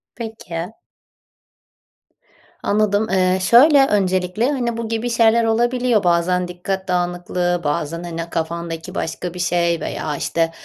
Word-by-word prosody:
Peki. 220 -6 -6 1.9
Anladım. 210 +1 +1
Eee, 185 0 +2
şöyle, 270 +7 +6
öncelikle, 190 +3 +1
hani, 240 -4 -2
bu 230 -1 -3
gibi 225 +2 -2
şeyler 230 0 +3
olabiliyor. 240 0 +1
Bazen 180 +1 +1
dikkat 190 +2 -4
dağınıklığı, 175 0 -1
bazen, 150 +3 -2
hani, 165 -1 -5
kafandaki 165 0 -4
başka 170 +2 -4
bir 180 - -8
şey 170 -1 +1
veya, 150 - -3
işte, 165 +3 -1
180 Hz, 120 wpm, -20 LUFS, 170-225 Hz, 1.9 s, şöyle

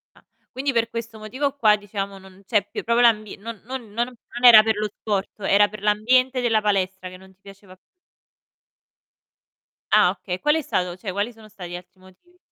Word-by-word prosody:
Ah, - - -23 0.3
quindi 270 +1 -2
per 230 0 +1
questo 230 -1 -7
motivo 265 +7 -3
qua 215 -6 +4
diciamo, 200 -1 -6
non 190 0 -17
c'è 205 -1 0
più - - -6
proprio 235 +1 +2
l'ambie 215 -3 +2
non 220 0 -9
non 245 -3 -8
non 240 +2 -3 0.3
era 225 -3 +10
per 220 0 +1
lo 210 0 -1
sport, 200 -3 -2
era 205 +1 +3
per 215 -1 -10
l'ambiente 250 +5 +2
della 225 -3 +2
palestra 190 -2 -1
che 185 - -12
non 190 0 -18
ti 185 - -40
piaceva 195 -1 -15 2.2
Ah - - +5
okay, 180 -1 -6
qual 295 +1 +2
è 320 - 0
stato 180 -8 -2
cioè, 190 0 -6
quali 205 +5 -3
sono 220 -1 -16
stati 180 -4 -10
gli - - -5
altri 180 +1 -13
motivi? 190 - -22
210 Hz, 190 wpm, -22 LUFS, 195-235 Hz, 2.2 s, era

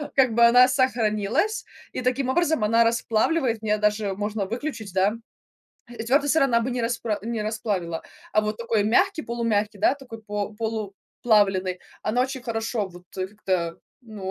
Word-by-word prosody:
как 255 -4 +4
бы 235 +1 +6
она 245 +2 +7
сохранилась, 255 - +1 0.3
и - - -4
таким 255 +1 0
образом 320 -3 +2
она 230 +2 +4
расплавливает. 230 +2 +1
Мне 215 -1 +1
даже 210 -1 0
можно 205 0 -2
выключить, 230 -2 -5
да, 190 +2 +2 0.8
и 240 -2 -6
твёрдый 280 +5 +2
сыр 320 +1 +4
она 235 -3 +3
бы 240 +3 -2
не 245 0 -2
распра 230 -2 -1
не 230 0 -3
расплавила, 205 -6 -2 0.3
а 215 - +4
вот 215 0 -2
такой 230 -2 0
мягкий, 345 - +2
полумягкий, 220 -4 -1
да. 250 - +3
Такой 250 -5 -11
по 205 -1 -4
полуплавленый, 205 -3 0 0.2
она 245 +4 +1
очень 260 0 -4
хорошо 225 -3 -2
вот, 175 0 -14
э, 185 - -1
как-то, 185 -4 -2 0.3
ну, 205 -5 -7
225 Hz, 165 wpm, -24 LUFS, 205-245 Hz, 0.8 s, она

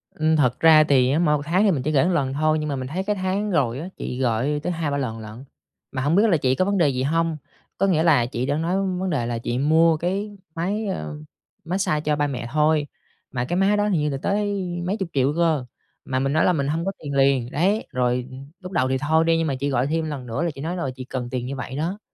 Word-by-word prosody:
Ừm. 155 0 +2
Thật 130 -5 +2
ra 160 -1 +7
thì 135 -3 +3
á, 150 - +2
mỗi 150 -3 +3
một - - -6
tháng 180 +6 +2
thì 205 - +4
mình 140 -7 -1
chỉ 155 - 0
gửi 145 +2 +3
lần 145 -7 0
thôi, 155 +2 +1
nhưng 150 0 -3
mà 140 - -1
mình 130 -1 -4
thấy 180 +7 -3
cái 210 +1 -1
tháng 195 +2 -1
rồi 135 -7 +1
á, 170 - -5
chị 125 - -5
gọi 130 +4 0
tới 180 - -1
2-3 155 -4 -2
lần 115 -5 -3
lận. 110 +4 -9 0.5
Mà 130 - -3
hổng 145 +5 +2
biết 205 - +5
là 170 - +4
chị 130 -2 +1
có 185 - +1
vấn 200 +1 0
đề 165 -5 +4
gì 130 -1 -1
hông. 165 +2 0 0.4
Có 195 - +2
nghĩa 165 -4 +2
là 150 -8 +4
chị 120 0 -3
đã 145 +2 0
nói 165 +3 0 0.2
vấn 190 - -1
đề 140 -8 0
là 120 0 -2
chị 120 +1 -3
mua 160 +3 +4
cái 200 +5 -3 0.2
máy, 200 +6 -2
à, 75 - -3 0.6
mát 175 +3 -1
xa 155 -6 0
cho 150 0 0
ba 145 0 0
mẹ 125 -4 -4
thôi, 150 0 +2 0.4
mà 125 -2 -2
cái 175 +7 -2
máy 195 +2 +3
đó 205 0 +1
hình 180 -7 +1
như 150 - 0
là 135 - -2
tới 205 -1 0 0.2
mấy 200 +4 -1
chục 190 -3 -3
triệu 135 +1 +2
cơ, 160 -6 +1 0.4
mà 130 0 -1
mình 135 +1 0
nói 155 - +3
là 180 - +4
mình 140 -3 -1
hông 165 +4 -1
có 195 - 0
tiền 145 - -4
liền, 135 -3 +2
đấy. 195 +9 +1
Rồi 125 0 0 0.3
lúc 185 -1 -9
đầu 130 -8 +1
thì 130 - +1
thôi 160 +4 +2
đi, 165 0 +3
nhưng 165 -1 0
mà 135 - -1
chị 140 +2 -1
gọi 130 0 +1
thêm 160 +1 -1
lần 145 -5 -5
nữa 125 +7 -2
là 170 - 0
chị 135 - -8
nói, 170 +4 -3
ờ, 135 -7 -2
chị 130 -1 -8
cần 125 -2 -5
tiền 125 -1 -3
như 135 +2 -4
vậy 130 0 -6
đó. 175 +7 -2
150 Hz, 280 wpm, -23 LUFS, 130-175 Hz, 0.6 s, ra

